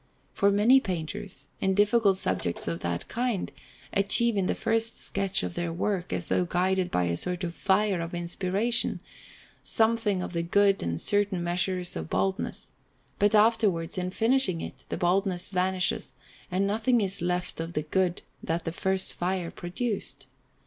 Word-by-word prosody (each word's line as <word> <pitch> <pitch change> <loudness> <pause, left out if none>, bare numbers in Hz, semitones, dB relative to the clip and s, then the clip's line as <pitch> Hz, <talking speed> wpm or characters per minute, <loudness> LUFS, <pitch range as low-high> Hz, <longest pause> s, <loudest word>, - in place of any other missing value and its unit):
For 200 - +3
many 215 +7 +5
painters, 190 - -5
in 190 0 +1
difficult 205 -1 +3
subjects 90 - -1
of 85 0 -2
that 85 0 -3
kind, 240 -5 -2 0.4
achieve 210 +4 +4
in 195 -2 +1
the - - 0
first 225 0 +1
sketch 195 - +1
of 90 -1 -3
their 175 -1 -3
work, 180 +1 -2
as 175 - -2
though - - +2
guided 180 +1 0
by 90 - 0
a 85 -1 0
sort 180 - -1
of 170 -1 -3
fire 195 0 +1
of 170 +1 -5
inspiration, 190 +7 +1 0.6
something 220 -4 +1
of - - -6
the 170 - 0
good 195 +3 +3
and 85 - -2
a - - -4
certain 205 - +1
measure 175 +2 0 0.2
of 80 -1 -5
boldness; 95 0 -2 0.5
but 205 +1 +3
afterwards, 210 -6 +2
in 180 -1 -2
finishing 225 -3 +2
it, - - -8
the - - -3
boldness 180 0 +1
vanishes, 185 -1 0 0.3
and 190 +2 0
nothing 225 +4 +2
is 195 -3 -1
left 180 0 -2
of 165 +1 -4
the 150 - -1
good 180 +3 0 0.2
that 165 +1 -2
the 165 - -2
first 190 +1 0
fire 180 -1 -2
produced. 195 - -4
190 Hz, 165 wpm, -27 LUFS, 175-205 Hz, 0.6 s, many